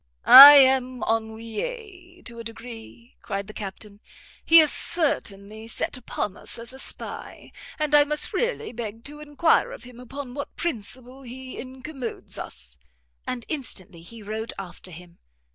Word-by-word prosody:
"I 285 +2 +12
am 260 -2 +4
ennuyé 345 - -5
to 235 -1 -8
a - - -7
degree," 230 +1 -11
cried 200 0 -4
the 215 - -11
Captain; 205 0 -8 0.4
"he 330 0 +8
is 310 -2 +4
certainly 220 - -1
set - - -2
upon 220 -5 -5
us - - -4
as 235 +2 -4
a 265 - -10
spy, - - -3 0.3
and 305 -1 -2
I 295 0 +7
must 300 +1 -1
really 475 -2 -2
beg 225 -3 -6
leave 230 - -22
to 295 +3 -9
enquire 300 - +1
of - - -10
him 245 -1 -13
upon 255 +1 -8
what 285 +2 -7
principle 255 -3 -5
he 260 +1 -10
incommodes 260 0 -8
us." 65 0 -11 0.5
And 245 -2 -5
instantly 195 - -6
he 220 +6 -12
rode 220 +2 -5
after 185 -1 -9
him. 175 0 -14
245 Hz, 155 wpm, -24 LUFS, 220-290 Hz, 0.5 s, I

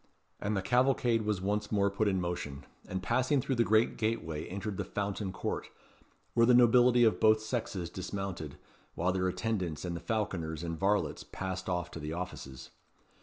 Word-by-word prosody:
And 105 0 -1
the 95 - -1
cavalcade 125 -2 +3
was 105 -3 -1
once 105 +2 -1
more 100 -2 +2
put 105 +2 +1
in 95 -2 +2
motion, 85 -6 -4 0.2
and 95 0 -4
passing 130 +7 +2
through 130 - -1
the 120 -2 +3
great 110 +2 +3
gateway 85 -9 -2
entered 100 +1 -4
the - - -1
Fountain 100 -1 -3
Court, - - -4 0.6
where 115 0 +4
the 125 - +6
nobility 120 0 +6
of 110 - +4
both 110 0 +5
sexes 110 -6 -3
dismounted, 95 -4 -5 0.4
while 90 +2 +1
their 95 0 0
attendants 90 -6 -2
and 85 -1 -3
the - - -4
falconers 85 -4 -2
and 85 -2 -4
varlets 100 +1 +1
passed 95 0 -5
off 90 -1 -2
to - - -7
the 75 +1 -4
offices. 70 -7 -7
100 Hz, 175 wpm, -31 LUFS, 90-110 Hz, 0.6 s, the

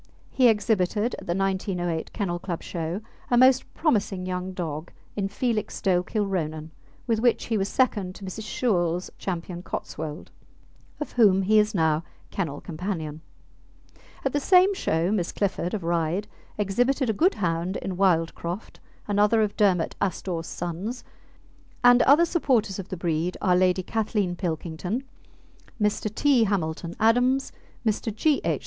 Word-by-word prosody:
He 255 -2 +5
exhibited 210 0 +1
at - - -12
the 170 - 0
1908 185 -3 -1
Kennel 175 -4 -2
Club 175 -2 -5
show 170 +4 -4 0.3
a 245 - +3
most 255 +1 +5
promising 205 - 0
young 185 0 -3
dog 165 -3 -5 0.2
in 200 -2 -1
Felixstowe 200 -4 0
Kilronan, 175 -6 -2 0.3
with 230 -3 +1
which 240 0 +2
he 230 - -1
was 195 -1 0
second 205 -8 +1
to 200 - -9
Mrs. 210 +3 -6
Shewell's 180 -8 0
Ch. - - -14 0.4
Cotswold, 155 -3 -6 0.7
of 300 - -4
whom 200 -5 +4
he 215 +3 +5
is 210 0 +1
now 160 -2 +2 0.3
kennel 160 -7 -3
companion. 160 -3 -4 1.0
At 270 - 0
the 290 - +2
same 370 +6 +5
show 170 - 0
Miss 185 -5 0
Clifford, 195 -2 -1
of 195 - -4
Ryde, 170 +4 0 0.3
exhibited 245 +7 +1
a 220 - +1
good 350 - +3
hound 175 0 -1
in 190 - -4
Wildcroft, 175 +1 0 0.3
another 210 +2 +3
of 210 - -2
Dermot 185 -5 +2
Astore's 175 -3 -2
sons, 180 +8 -4 0.8
and 245 0 +7
other 290 +7 +6
supporters 250 - +1
of 195 - -7
the 185 - -4
breed 170 +1 -1
are 180 -2 +3
Lady 185 0 +3
Kathleen 210 -3 -1
Pilkington, 175 - -3 0.8
Mr. 210 0 0
T. 270 -6 +4
Hamilton 170 -4 -2
Adams, 245 +4 +3 0.3
Mr. 220 +1 0
G. 280 +8 +1
H. - - 0
195 Hz, 145 wpm, -25 LUFS, 175-220 Hz, 1.0 s, and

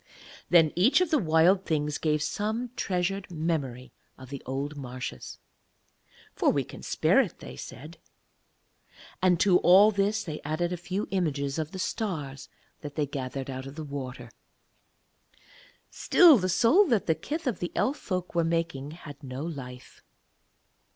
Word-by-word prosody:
Then 165 -3 +5
each 205 - +4
of 365 -3 0
the 305 - +4
Wild 175 +1 +4
Things 150 -3 -1
gave 150 -1 +1
some 220 +6 -2
treasured 190 0 -2
memory 155 -7 -3 0.2
of 130 0 -12
the 140 - -6
old 140 +3 -3
marshes, 125 - -7 1.0
'For - - +2
we - - +1
can - - -11
spare - - +3
it,' - - -5
they - - -10
said. 155 +6 -10 1.2
And 180 -2 +3
to 185 -3 +5
all 195 +4 +7
this 205 +2 0
they 155 -4 -6
added 170 +4 -2
a - - -1
few 185 +4 -4
images 145 -6 -1
of 155 -1 -2
the 190 - -8
stars 155 - -4 0.3
that 145 -1 -8
they 150 - 0
gathered 135 -1 -5
out 130 +1 -6
of 135 - -10
the 160 - -6
water. 130 -4 -7 1.6
Still 330 -9 +6
the 185 0 -1
soul 285 - +4
that 225 - +1
the 160 - +3
kith 310 - -5
of 245 -8 -1
the 175 - -3
Elf 275 +4 +1
folk 180 -2 -4
were 170 -1 +2
making 165 -4 -2 0.2
had 145 -1 -10
no 130 0 -6
life. 130 -6 -8
160 Hz, 155 wpm, -28 LUFS, 140-190 Hz, 1.6 s, all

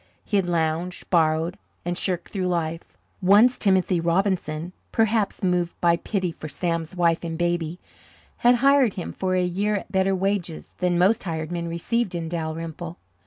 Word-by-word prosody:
He 205 - +1
had 190 -3 +1
lounged, 170 +1 -1
borrowed, 165 +2 +2 0.3
and 175 0 -1
shirked 180 -1 -2
through 185 -3 -2
life. 165 -2 -3 0.2
Once 210 +7 +5
Timothy 190 -3 +3
Robinson, 170 -1 0 0.2
perhaps 220 -3 +1
moved 180 -2 0
by 170 -1 +4
pity 185 0 -2
for 155 -1 -8
Sam's 165 +3 -2
wife 170 -1 +2
and 165 -1 -4
baby, 175 0 -1 0.6
had 245 +1 +5
hired 275 -6 +5
him 180 - -4
for 185 -1 -1
a 180 - +2
year 200 +4 0
at 200 - -5
better 190 0 +2
wages 190 -3 -2
than 180 -1 +1
most 200 +6 +3
hired 160 -2 -3
men 170 -1 -3
received 180 +4 -1
in 165 -1 -3
Dalrymple. 165 0 -5
175 Hz, 165 wpm, -24 LUFS, 165-195 Hz, 0.6 s, Once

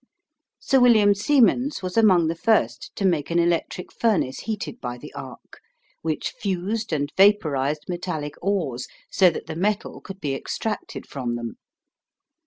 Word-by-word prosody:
Sir 270 - +3
William 220 -5 +6
Siemens 250 +2 +2
was 180 0 -4
among 190 -7 +5
the 160 - 0
first 220 +5 +1
to 200 - -1
make 165 -6 +1
an 170 - 0
electric 170 +1 0
furnace 190 - +1
heated 220 +2 -5
by 120 0 -4
the - - -11
arc, - - -10 0.4
which 160 -2 -2
fused 200 +3 -3
and 145 -1 -1
vapourised 155 -8 +3
metallic 175 -5 -4
ores, 170 -11 -1 0.2
so 185 -2 +5
that 165 - -6
the 160 - -6
metal 205 +4 -1
could 195 -1 -9
be 145 -6 -2
extracted 210 +9 -4
from 125 -4 -3
them. 120 -1 -6
180 Hz, 150 wpm, -24 LUFS, 150-210 Hz, 0.4 s, William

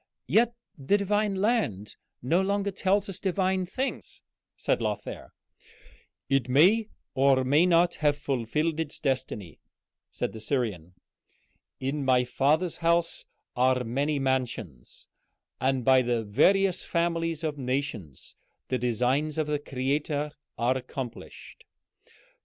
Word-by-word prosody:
"Yet 235 +1 +3 0.2
the 145 +10 +2
divine 205 0 0
land 190 - 0 0.3
no 165 +9 +2
longer 200 +1 0
tells 195 +1 +1
us 195 - -6
divine 190 -1 0
things," 260 +8 -4 0.3
said - - 0
Lothair. - - -4 1.0
"It 135 -2 +1
may 195 - +4 0.2
or 135 -1 +4
may 145 +7 +4
not 175 0 +4
have 145 -1 +3
fulfilled 145 +4 -1
its 160 -3 -3
destiny," 130 - -3 0.5
said - - -3
the 110 - -8
Syrian. 105 - -2 0.8
"'In 140 +2 -2
my 130 -2 +4
Father's 150 +7 +1
house 170 0 +1 0.3
are 125 0 +2
many 140 +6 -1
mansions,' 125 - -3 0.5
and 130 -2 0
by 130 -1 +6
the 120 -2 0
various 185 - +3
families 165 -1 -1
of 150 -2 -2
nations 125 - -4 0.3
the 130 - 0
designs 125 +6 0
of 155 - +1
the 150 0 -1
Creator 145 +2 -2 0.3
are 125 +2 +2
accomplished. 130 -1 -7
145 Hz, 120 wpm, -27 LUFS, 125-175 Hz, 1.0 s, by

